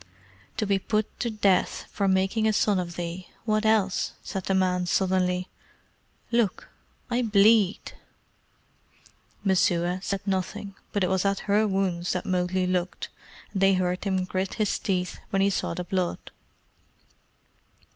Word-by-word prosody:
"To 215 - 0
be 200 -1 +2
put 215 +2 -2
to 240 - 0
the 215 - -8
death 195 -3 +2
for 200 - 0
making 195 +4 +2
a 215 - +2
son 205 -2 +2
of 170 -1 -4
thee 175 +1 -5 0.2
what 215 -1 +1
else?" 205 -4 +2
said 190 -2 -5
the 195 - +1
man 180 -1 +1
sullenly. 180 0 +1 0.8
"Look! 230 -5 0 0.4
I 240 +1 +2
bleed." 210 -2 +4 1.5
Messua 180 -1 +2
said 195 0 -3
nothing, 195 +1 -2 0.2
but 205 - 0
it 180 - +1
was 190 -1 +2
at 200 -1 0
her 210 +1 +2
wounds 185 -3 0
that 180 - -3
Mowgli 185 0 0
looked, 180 0 -2 0.4
and 195 - -2
they 195 0 +5
heard 180 0 -1
him 190 -2 0
grit 185 +1 -2
his 215 -3 0
teeth 180 -2 -2
when 195 0 +2
he 200 - +3
saw 180 - -2
the 180 - -3
blood. 180 -1 -2
190 Hz, 150 wpm, -26 LUFS, 180-205 Hz, 1.5 s, they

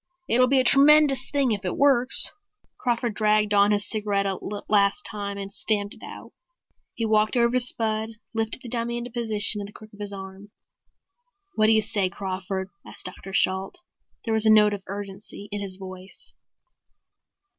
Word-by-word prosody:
It'll 255 +2 +4
be 270 +1 +3
a - - +3
tremendous 285 +1 +5
thing 280 -4 +1
if 205 -2 -2
it 180 - -3
works." 270 -3 +3 0.5
Crawford 240 -2 -1
dragged 215 0 +2
on 200 0 +5
his 205 0 +2
cigarette 205 -2 -1
a 195 -1 -2 0.3
last 205 +6 +2
time 200 -2 -4
and 195 0 -6
stamped 205 0 -1
it - - -14
out. - - -10 0.6
He 230 - -2
walked 215 +2 +2
over 235 0 +3
to 255 - +2
Spud, 220 -3 +2 0.2
lifted 225 +2 -2
the - - -7
dummy 235 0 -2
into 240 0 -6
position 215 -3 +2
in 200 - -6
the - - -12
crook 215 +1 -14
of 205 - -16
his 205 -1 -5
arm. 195 +1 -10 1.0
"What 215 -7 +3
do - - +4
you 220 -1 +3
say, 205 -3 0
Crawford?" 190 0 -5
asked - - -8
Dr. 185 +1 -5
Shalt. 190 - 0 0.5
There 225 - -1
was 220 0 +5
a - - +6
note 210 -1 +6
of 200 - -5
urgency 200 +1 -7
in 205 0 -4
his 190 -2 -5
voice. 185 0 -9
210 Hz, 180 wpm, -24 LUFS, 200-230 Hz, 1.0 s, a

